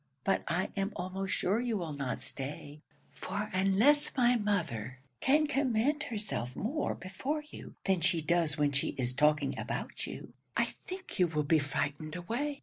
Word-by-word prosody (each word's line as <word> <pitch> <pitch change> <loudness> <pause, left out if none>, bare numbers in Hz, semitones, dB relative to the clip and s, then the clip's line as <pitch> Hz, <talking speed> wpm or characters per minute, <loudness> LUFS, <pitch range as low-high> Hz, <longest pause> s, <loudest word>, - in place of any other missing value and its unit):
But 195 - +2
I 175 +3 0
am 195 +1 0
almost 185 +2 -3
sure 200 +5 +2
you 240 -3 0
will 165 -5 -3
not 140 -3 -3
stay; 145 +2 -6 0.3
for 210 +1 -4
unless 200 +13 +4
my 245 -1 +5
mother 170 - -1 0.2
can 300 +3 +4
command 275 0 +2
herself 205 - -3
more 285 - -1
before 260 +12 -3
you - - -10
than 190 -3 +2
she 170 0 +3
does 160 -1 +2
when 145 -1 +3
she 140 0 0
is 125 -1 0
talking 150 +1 +2
about - - -3
you, - - -8 0.2
I - - +1
think 370 - -7
you 180 - +6
will 150 -2 0
be 155 +2 +4
frightened 145 +2 -2
away. 255 +11 -2
185 Hz, 165 wpm, -32 LUFS, 150-235 Hz, 0.3 s, you